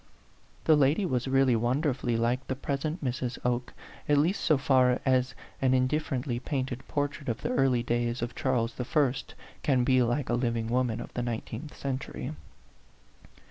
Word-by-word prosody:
The 160 - +5
lady 150 +7 +3
was 130 -6 -1
really 135 -2 +4
wonder 130 +6 +1
fully 120 -2 -1
like 120 +3 0
the 130 - -1
present 145 +5 -3
Mrs. 125 0 -2
Oke, 125 0 0 0.4
at 145 - +5
least 165 +8 +2
so 155 - +4
far 130 -2 +3
as 130 -1 +2 0.3
an 130 -1 +3
indifferently 130 -2 0
painted 130 -1 -3
portrait 145 -1 -2
of 115 - -3
the - - -1
early 125 -2 +2
days 120 0 -1
of 120 0 -3
Charles 125 -3 0
I. 135 0 +2 0.5
can 130 -4 +2
be 130 0 +4
like 120 +3 0
a - - +1
living 115 -2 0
woman 125 -2 0
of - - -9
the 125 - -2
nineteenth 120 +4 -5
century. 135 -1 -4
130 Hz, 165 wpm, -29 LUFS, 120-140 Hz, 0.5 s, The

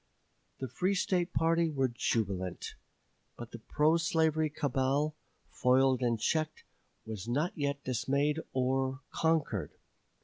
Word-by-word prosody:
The 130 - -3
free 180 - 0
State 180 -1 0
party 165 0 +2
were 135 -3 +1
jubilant; 100 -6 -2 0.6
but 120 -1 -8
the 115 - -8
pro 150 +8 +2
slavery 160 -2 +2
cabal, 145 +1 0 0.4
foiled 130 0 +3
and 120 -2 +1
checked, 155 +5 -1 0.4
was 110 -2 -6
not 145 +9 0
yet 140 -2 -2
dismayed 140 +4 0
or 130 +1 0
conquered. 160 -2 0
140 Hz, 115 wpm, -31 LUFS, 125-160 Hz, 0.6 s, foiled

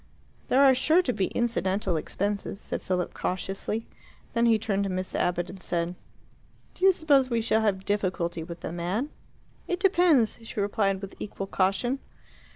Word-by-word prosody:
"There 270 +2 +5
are 270 -1 +7
sure 315 +8 +4
to 250 - 0
be 195 -4 0
incidental 195 -5 0
expenses," 200 +5 -2
said - - -4
Philip 180 -1 -1
cautiously. 195 +4 -3 0.5
Then 235 0 +3
he 225 -1 +5
turned 200 -2 -1
to - - -2
Miss 185 0 -3
Abbott 175 0 0
and 185 +1 -10
said, 170 -1 -1 0.8
"Do - - -10
you 385 - +9
suppose 285 -7 +3
we 235 -2 +1
shall 220 0 +2
have 195 -3 0
difficulty 185 -4 -1
with 170 +1 -8
the - - -4
man?" 185 - -2 0.6
"It 360 -1 -1
depends," 350 - +4
she 225 -1 -6
replied, 200 -1 0
with 195 - -6
equal 195 -1 -5
caution. 195 +8 0
205 Hz, 165 wpm, -27 LUFS, 185-245 Hz, 0.8 s, you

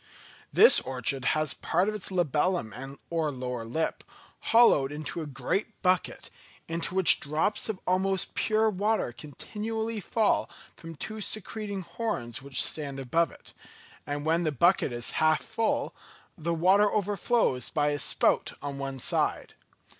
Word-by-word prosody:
This - - +8
orchid 130 0 0
has 155 -2 0
part 180 +4 0
of 215 - -1
its 210 -3 -1
labellum 150 - -1
or 165 -2 0
lower 125 -3 -5
lip 160 +8 -3 0.4
hollowed 225 - +4
out - - -6
into 155 +2 -5
a 155 - -6
great 195 - -3
bucket, 185 -1 0 0.4
into 165 +2 -3
which 190 -3 +6
drops 155 +10 0
of 205 -4 -3
almost 190 +1 0
pure 220 0 +1
water 210 - 0
continually 220 - -5
fall 215 +2 0 0.3
from 165 0 -10
two 215 +8 -6
secreting 210 -1 -3
horns 165 - -4
which 140 0 +1
stand 140 -3 -3
above 165 +6 +1
it; - - -16 0.5
and 145 +1 -4
when 165 +2 +2
the 160 -3 0
bucket 170 +2 +2
is 120 0 -3
half 155 0 +3
full, 225 0 -1 0.4
the 170 -1 -3
water 195 +5 +4
overflows 205 - 0
by 150 -1 +1
a 145 0 -2
spout - - +2
on 140 -1 -6
one 135 -1 -4
side. 130 - -1
165 Hz, 145 wpm, -28 LUFS, 140-205 Hz, 0.5 s, This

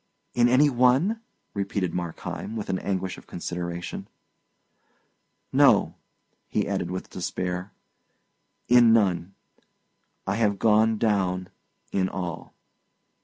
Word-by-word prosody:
"In 120 0 +4
any 130 +4 +5
one?" 135 - +3 0.3
repeated 100 -3 -2
Markheim, 90 +5 -5
with 110 - -3
an 95 - -1
anguish 95 -1 -3
of - - -20
consideration. 85 0 -5 1.5
"No," - - +5 0.5
he - - -1
added, 85 - -2
with 90 +1 -5
despair; 90 +1 -3 1.0
"in 120 -2 +7
none! 95 -4 +1 0.9
I 95 +1 -1
have 105 -3 +2
gone 110 +1 +3
down 95 -4 0 0.4
in 95 -1 +1
all." 90 -3 -6
100 Hz, 105 wpm, -26 LUFS, 90-115 Hz, 1.5 s, in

